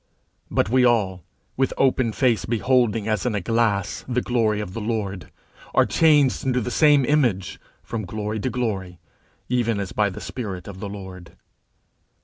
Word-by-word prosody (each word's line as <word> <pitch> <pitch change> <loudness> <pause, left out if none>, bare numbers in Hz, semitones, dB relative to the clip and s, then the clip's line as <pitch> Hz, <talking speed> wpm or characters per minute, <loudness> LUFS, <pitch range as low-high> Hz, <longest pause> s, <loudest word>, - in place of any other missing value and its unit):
_But - - +2
we 125 +3 +3
all, 100 -7 +2 0.3
with 135 0 0
open 130 -3 +2
face 115 -4 +1
beholding 115 -2 +1
as 110 +1 0
in 115 - -1
a - - 0
glass 105 -1 0
the 125 -1 -1
glory 110 -4 +1
of 105 -3 -5
the 115 - -5
Lord, 105 -4 -3 0.5
are - - +5
changed 150 -5 +3
into 130 -1 +1
the 125 +1 -3
same 145 -1 +4
image 120 - +1 0.2
from 110 -3 -4
glory 105 +2 -4
to 130 - -1
glory, 100 -8 -3 0.5
even 120 -4 0
as 100 -2 -4
by 105 -1 +1
the 95 - -8
spirit 100 -8 -6
of 95 -2 -9
the 100 0 -5
Lord_. 95 -3 -9
II. - - -23
110 Hz, 170 wpm, -23 LUFS, 100-125 Hz, 0.5 s, are